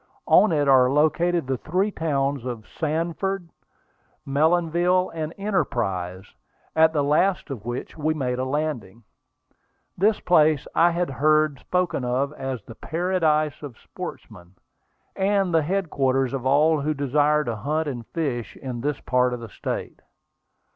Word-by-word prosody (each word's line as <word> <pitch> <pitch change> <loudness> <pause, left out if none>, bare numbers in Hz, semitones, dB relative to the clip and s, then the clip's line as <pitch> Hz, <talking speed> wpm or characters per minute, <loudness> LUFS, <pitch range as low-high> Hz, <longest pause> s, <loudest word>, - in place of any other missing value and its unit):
On 210 - +5
it 145 -3 +1
are 130 -2 +6
located 160 +3 +2
the 130 -1 -2
three 185 +6 0
towns 140 - -1
of 120 -3 -6
Sanford, 170 +3 -2 0.8
Mellonville, 170 +5 +2
and 160 -1 -4
Enterprise, 95 - -2 0.5
at 160 0 +5
the 150 -3 0
last 155 +3 +1
of 115 -6 -7
which 120 +1 -5
we 155 +1 0
made 125 -4 -2
a - - 0
landing. 130 -7 -3 0.9
This 205 +3 +2
place 155 -4 +3
I 170 - +5
had 175 -3 -1
heard 155 +1 +2
spoken 180 -7 -1
of 130 +4 -1
as 135 -4 -5
the - - -11
"paradise 160 -1 0
of 140 -6 -9
sportsmen," 90 +2 -10 0.6
and 195 -2 +1
the 165 - +4
headquarters 140 -7 0
of 130 -1 -2
all 150 +3 +3
who 155 +2 -1
desire 145 +2 +2
to 120 -5 -3
hunt 150 +8 -1
and 120 -5 -5
fish 135 -8 -3
in 125 -3 -6
this 145 +2 -2
part 125 -1 +1
of - - -8
the 115 -1 -9
state. - - -5
150 Hz, 145 wpm, -24 LUFS, 130-165 Hz, 0.9 s, are